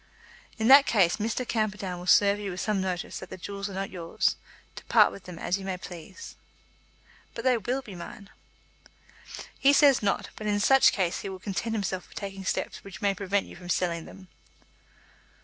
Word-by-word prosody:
"In 220 -1 0
that 275 +2 +8
case 190 -6 +3
Mr. 230 +3 -2
Camperdown 205 -5 -2
will 180 - -9
serve 200 +2 +5
you 205 -1 -4
with 180 0 -5
some 210 -3 0
notice 185 -2 -3
that - - -10
the 185 - -8
jewels 200 +2 -5
are 195 - -8
not 195 0 -3
yours, 170 -3 -1 0.4
to - - -9
part - - +5
with 195 - -12
them 180 -2 -9
as 185 +4 -1
you - - -8
may 190 -1 -3
please." 180 - -10 1.0
"But - - -5
they 255 -1 +4
will 245 +5 -2
be 210 - -10
mine." 180 +3 -10 1.3
"He 280 +1 +5
says 280 -3 +5
not; 200 -2 -1
but 215 - -6
in 205 0 +1
such 270 +5 +6
case 180 -4 -1
he - - -5
will 190 - -6
content 210 +4 -3
himself 190 -3 -3
with - - -13
taking 195 -1 -6
steps - - -3
which 195 -1 -10
may 200 -1 +3
prevent 200 +1 -1
you - - -12
from 175 0 -11
selling 170 -2 -1
them." 190 -2 -13
195 Hz, 200 wpm, -27 LUFS, 185-215 Hz, 1.3 s, that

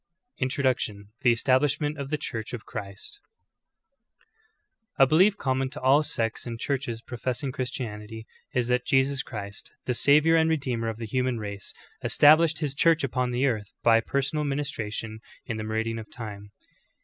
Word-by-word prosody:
INTRODUCTION: 130 -6 -1
THE 125 -3 +5
ESTABLISHMENT 145 +5 +1
OF 140 -1 -4
THE 150 - 0
CHURCH 115 -7 -5
OF 110 -4 -6
CHRIST. 100 - -8 1.8
1. 135 - +6
A - - -3
belief 190 +8 +4
common 130 -3 0
to 145 +3 -8
all 135 +3 +5
sects 120 -7 -2
and 115 -1 -5
churches 125 -4 -2
professing 130 +2 -3
Christianity 110 -4 -5 0.3
is 125 -2 0
that 125 0 +2
Jesus 135 +1 +2
Christ, 100 -3 -8
the 125 - 0
Savior 150 +6 +4
and 160 0 +3
Redeemer 125 -7 -1
of 110 - -5
the 115 - -5
human 125 +2 0
race, 100 -2 -6 0.3
established 155 +1 +5
His 145 -3 -1
Church 160 +2 +3
upon 125 -1 0
the 125 +2 +1
earth, 110 -6 -1
by 115 -1 +5
personal 140 +4 -1
ministration 115 -7 -3 0.3
in 115 -3 -4
the 110 - -4
meridian 110 +1 -2
of 110 - -9
time. 105 -3 -8
125 Hz, 160 wpm, -26 LUFS, 115-140 Hz, 1.8 s, 1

